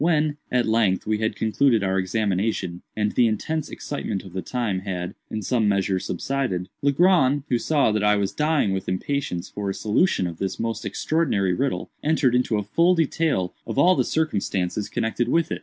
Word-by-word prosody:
When, 155 Hz, -2 st, +2 dB
at 125 Hz, -1 st, +2 dB
length, 110 Hz, -4 st, +2 dB
we 110 Hz, 0 st, 0 dB
had 110 Hz, 0 st, -1 dB
concluded 115 Hz, 0 st, +2 dB
our 95 Hz, 0 st, +1 dB
examination, 95 Hz, -2 st, -1 dB
and 105 Hz, -1 st, 0 dB
the 120 Hz, -, +3 dB
intense 155 Hz, +8 st, -2 dB
excitement 95 Hz, -, -4 dB
of 95 Hz, -3 st, -12 dB
the 95 Hz, -, -3 dB
time 115 Hz, -6 st, -2 dB
had, 90 Hz, -2 st, -4 dB, 0.2 s
in 110 Hz, -1 st, -4 dB
some 115 Hz, +1 st, +1 dB
measure, 95 Hz, -1 st, +1 dB
subsided, 95 Hz, -2 st, -2 dB
Legrand, 145 Hz, -2 st, +3 dB
who 120 Hz, -, +2 dB
saw 145 Hz, -5 st, +2 dB
that 105 Hz, -1 st, 0 dB
I 105 Hz, 0 st, +4 dB
was 100 Hz, -1 st, 0 dB
dying 150 Hz, -9 st, +1 dB
with 95 Hz, -1 st, -3 dB
impatience 95 Hz, -2 st, -2 dB
for 100 Hz, -1 st, -4 dB
a 95 Hz, -, -3 dB
solution 110 Hz, -, +1 dB
of 85 Hz, -2 st, -5 dB
this 95 Hz, -, -3 dB
most 115 Hz, -1 st, -3 dB
extraordinary 100 Hz, -, 0 dB
riddle, 135 Hz, +8 st, -2 dB
entered 150 Hz, -5 st, +2 dB
into 125 Hz, -3 st, +2 dB
a 105 Hz, -, -1 dB
full 170 Hz, -, +3 dB
detail 155 Hz, -, 0 dB
of -, -, -4 dB
all 175 Hz, +6 st, +6 dB
the -, -, +2 dB
circumstances 100 Hz, -, -1 dB
connected 115 Hz, 0 st, -1 dB
with 165 Hz, +3 st, +1 dB
it. -, -, -2 dB
110 Hz, 190 wpm, -24 LUFS, 95-140 Hz, 0.2 s, all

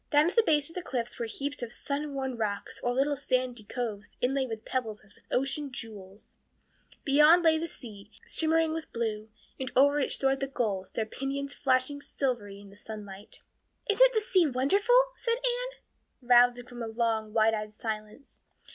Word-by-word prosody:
Down 295 Hz, +2 st, +5 dB
at -, -, -14 dB
the 460 Hz, -, +7 dB
base 300 Hz, -9 st, +2 dB
of 330 Hz, -, -7 dB
the 360 Hz, -, -4 dB
cliffs 245 Hz, -6 st, -4 dB
were 235 Hz, -, -2 dB
heaps 285 Hz, +5 st, -4 dB
of 240 Hz, -1 st, -4 dB
surf 285 Hz, +4 st, -3 dB
worn 265 Hz, -2 st, -3 dB
rocks 210 Hz, -3 st, -3 dB
or 245 Hz, -, 0 dB
little 275 Hz, +3 st, +1 dB
sandy 255 Hz, -3 st, -1 dB
coves 215 Hz, -2 st, -4 dB
inlaid 265 Hz, +1 st, 0 dB
with 225 Hz, 0 st, -6 dB
pebbles 225 Hz, -5 st, -3 dB
as 210 Hz, -2 st, -18 dB
with -, -, -26 dB
ocean 275 Hz, +2 st, -1 dB
jewels; 210 Hz, -5 st, -10 dB, 0.7 s
beyond 300 Hz, +5 st, +6 dB
lay 320 Hz, -1 st, +4 dB
the 335 Hz, -, -3 dB
sea, 210 Hz, -9 st, -10 dB, 0.2 s
shimmering 320 Hz, 0 st, +2 dB
and 325 Hz, -1 st, -6 dB
blue, 220 Hz, -2 st, -2 dB, 0.3 s
and 260 Hz, -1 st, -4 dB
over 285 Hz, +2 st, +5 dB
it 275 Hz, -, 0 dB
soared 270 Hz, 0 st, +1 dB
the 275 Hz, -, -1 dB
gulls, 210 Hz, -8 st, -2 dB
their 220 Hz, -, -2 dB
pinions 275 Hz, +4 st, -4 dB
flashing 265 Hz, +1 st, +1 dB
silvery 235 Hz, -9 st, -3 dB
in 200 Hz, -1 st, -14 dB
the -, -, -15 dB
sunlight. 205 Hz, -1 st, -9 dB, 0.4 s
"Isn't -, -, +6 dB
the 435 Hz, -, +3 dB
sea 380 Hz, -7 st, +3 dB
wonderful?" 400 Hz, -, +4 dB
said 465 Hz, -2 st, 0 dB
Anne, -, -, -2 dB, 0.5 s
rousing 245 Hz, 0 st, +5 dB
from 245 Hz, -1 st, -9 dB
a 230 Hz, -, -3 dB
long, 225 Hz, -1 st, -1 dB
wide 220 Hz, 0 st, +3 dB
eyed 215 Hz, 0 st, -5 dB
silence. 215 Hz, +3 st, -6 dB
255 Hz, 180 wpm, -29 LUFS, 220-290 Hz, 0.7 s, the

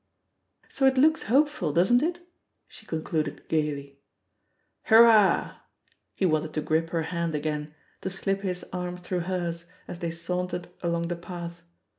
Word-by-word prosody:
"So 270 Hz, -1 st, +2 dB
it 265 Hz, 0 st, +3 dB
looks 315 Hz, +4 st, +4 dB
hopeful, 290 Hz, -, +2 dB
doesn't 185 Hz, -, +4 dB
it?'* 345 Hz, +2 st, -2 dB, 0.4 s
she -, -, -15 dB
concluded 155 Hz, -1 st, -3 dB
gaily 145 Hz, -3 st, -2 dB, 0.9 s
"Hurrah 220 Hz, -3 st, +7 dB
1" -, -, -16 dB, 0.6 s
He 195 Hz, -, 0 dB
wanted 155 Hz, -2 st, 0 dB
to 155 Hz, -, 0 dB
grip 160 Hz, +2 st, 0 dB
her 165 Hz, -1 st, -1 dB
hand 170 Hz, -1 st, -2 dB
again, 150 Hz, 0 st, -3 dB, 0.3 s
to -, -, -3 dB
slip 195 Hz, +1 st, -2 dB
his 180 Hz, -2 st, -3 dB
arm 180 Hz, 0 st, -3 dB
through 180 Hz, 0 st, -3 dB
hers, 170 Hz, -2 st, -2 dB, 0.2 s
as 170 Hz, -, -7 dB
they 170 Hz, -, -2 dB
saun 180 Hz, +2 st, -3 dB
tered 175 Hz, 0 st, -5 dB
along 170 Hz, -1 st, -1 dB
the 175 Hz, -, -1 dB
path. 170 Hz, 0 st, -8 dB
175 Hz, 155 wpm, -27 LUFS, 160-195 Hz, 0.9 s, Hurrah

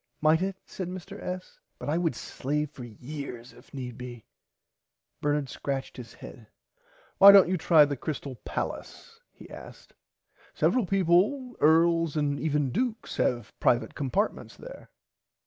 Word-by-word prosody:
Might 155 Hz, +2 st, +3 dB
it 190 Hz, 0 st, -1 dB
said 185 Hz, -, -6 dB
Mr 185 Hz, +2 st, -8 dB
S. 185 Hz, 0 st, -6 dB, 0.2 s
but -, -, -8 dB
I 155 Hz, +4 st, +1 dB
would 165 Hz, -7 st, 0 dB
slave 150 Hz, +4 st, -3 dB
for 130 Hz, -, -10 dB
years 125 Hz, +1 st, -8 dB
if -, -, -19 dB
need 125 Hz, -3 st, -7 dB
be. 120 Hz, -3 st, -9 dB, 1.0 s
Bernard 145 Hz, -1 st, 0 dB
scratched 135 Hz, +1 st, -4 dB
his 120 Hz, -3 st, -10 dB
head. 110 Hz, -4 st, -12 dB, 0.7 s
Why 200 Hz, +1 st, +11 dB
dont 200 Hz, -3 st, +8 dB
you 185 Hz, -, +1 dB
try 160 Hz, -3 st, +5 dB
the 145 Hz, 0 st, -3 dB
Crystal 140 Hz, -2 st, -5 dB
Pallace 455 Hz, -1 st, -6 dB
he -, -, -14 dB
asked -, -, -12 dB, 0.6 s
several 250 Hz, -7 st, +2 dB
peaple 195 Hz, +8 st, +2 dB
Earls 165 Hz, 0 st, +4 dB
and 145 Hz, -1 st, 0 dB
even 150 Hz, -4 st, 0 dB
dukes 240 Hz, -, -2 dB
have 120 Hz, -2 st, -1 dB
privite 120 Hz, 0 st, +2 dB
compartments 155 Hz, -, -2 dB
there. -, -, -11 dB
155 Hz, 145 wpm, -28 LUFS, 135-185 Hz, 1.0 s, Why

